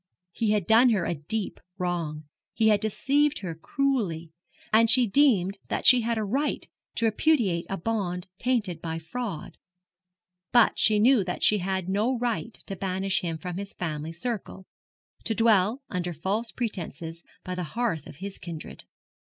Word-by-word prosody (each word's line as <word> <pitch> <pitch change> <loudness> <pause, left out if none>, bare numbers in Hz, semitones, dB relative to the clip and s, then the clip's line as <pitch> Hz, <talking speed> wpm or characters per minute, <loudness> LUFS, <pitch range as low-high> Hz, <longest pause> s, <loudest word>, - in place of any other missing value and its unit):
He 225 +4 -1
had 210 -4 +1
done 230 +5 +6
her 210 -6 +1
a - - 0
deep 190 +8 -3 0.2
wrong; 170 -4 -3 0.3
he 220 -1 +4
had 210 -1 +4
deceived 280 +7 +1
her 180 -4 -4
cruelly; 175 - -1 0.4
and 225 +1 +6
she 250 +1 +6
deemed 200 -6 +3
that - - -3
she 250 -2 +8
had 230 0 -1
a 220 - 0
right 270 +9 -1 0.3
to 230 - +1
repudiate 215 - +2
a 195 - -2
bond 180 -3 -2
tainted 210 -10 -1
by 165 -1 -3
fraud; 175 +2 -6 0.9
but 240 -2 +4
she 215 - +5
knew 235 0 +5
that 180 - -3
she 210 - +5
had 190 0 -2
no 215 +7 +1
right 230 -2 -2
to 195 - -5
banish 190 +1 -1
him 165 -2 -3
from 180 +1 -6
his 200 0 -6
family 155 -2 -4
circle 190 0 -5 0.6
to 225 - 0
dwell, 225 +3 +3
under 180 -1 -3
false 200 +8 -2
pretences, 170 - -5 0.2
by 185 - -4
the 180 - -3 0.2
hearth 200 - -1
of - - -11
his 195 +5 -7
kindred. 165 -3 -8
200 Hz, 165 wpm, -27 LUFS, 175-230 Hz, 0.9 s, she